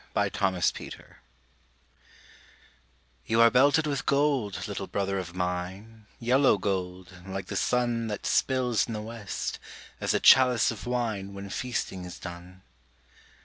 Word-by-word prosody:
THE - - +1
HOMING 95 -2 0
BEE - - -8 2.3
You 115 - +2
are 115 0 +7
belted 140 +5 +4
with 140 -3 -2
gold, 140 -8 +1
little 100 -1 -5
brother 100 -1 -1
of 90 -1 -7
mine, 95 +5 -4
Yellow 125 0 +3
gold, 90 -2 -3
like 95 -1 -4
the - - -6
sun 120 -2 0
That 105 -2 -5
spills 125 -4 +1
in 115 - -4
the 105 - -4
west, 110 -3 -5 0.4
as - - 0
a - - +3
chalice 125 -4 +6
of 110 +1 -8
wine 110 -6 -2
When 100 0 -7
feasting 95 -7 -3
is 90 - -8
done. 90 +1 -10
105 Hz, 140 wpm, -27 LUFS, 95-125 Hz, 2.3 s, are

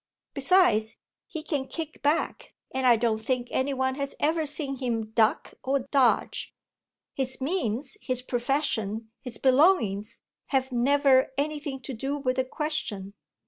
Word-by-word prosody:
Besides, 265 - +3 0.3
he 320 -2 -6
can 285 -4 -2
kick 320 0 -6
back 300 +3 0 0.2
and 260 0 +1
I 240 - +7
don't 225 -1 +1
think 245 0 -1
any 270 +2 0
one 260 0 0
has 275 - -3
ever 315 +1 +1
seen 280 -2 -1
him 230 -4 -2
duck 220 -1 +2
or 270 +1 +1
dodge. 265 -4 +2 0.6
His 265 -1 -3
means, 275 - -2
his 255 -1 -2
profession, 235 -4 -1
his 250 -4 -6
belongings 255 - +3 0.3
have 265 -1 0
never 265 +2 +4
anything 290 -2 -2
to 265 - -6
do 270 +5 -2
with 255 -2 -1
the 260 - +1
question. 255 -10 -3
265 Hz, 140 wpm, -27 LUFS, 240-290 Hz, 0.6 s, I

